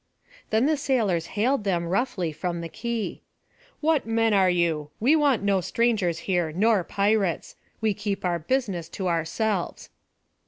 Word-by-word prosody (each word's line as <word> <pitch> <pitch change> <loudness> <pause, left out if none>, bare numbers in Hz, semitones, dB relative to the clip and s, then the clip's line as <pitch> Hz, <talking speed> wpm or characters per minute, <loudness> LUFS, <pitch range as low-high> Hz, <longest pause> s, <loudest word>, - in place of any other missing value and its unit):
Then 220 +3 +2
the 310 +1 +2
sailors 215 - 0
hailed 245 +2 +2
them 175 -4 0
roughly 185 -2 -1
from 170 +3 -3
the 165 - -6
quay: 235 +3 -4 0.6
"What 310 -5 +2
men 225 -1 +2
are 190 -2 +4
you? 165 -4 0
we 265 +8 +4
want 285 -9 +2
no 200 -2 +2
strangers 210 -5 +1
here, 175 -4 0
nor 205 +3 +2
pirates. 200 -2 0 0.3
We 220 -2 +2
keep 200 -1 -3
our 175 -1 0
business 185 -4 -1
to 190 - -4
ourselves." 175 +3 -2
200 Hz, 150 wpm, -25 LUFS, 175-230 Hz, 0.6 s, are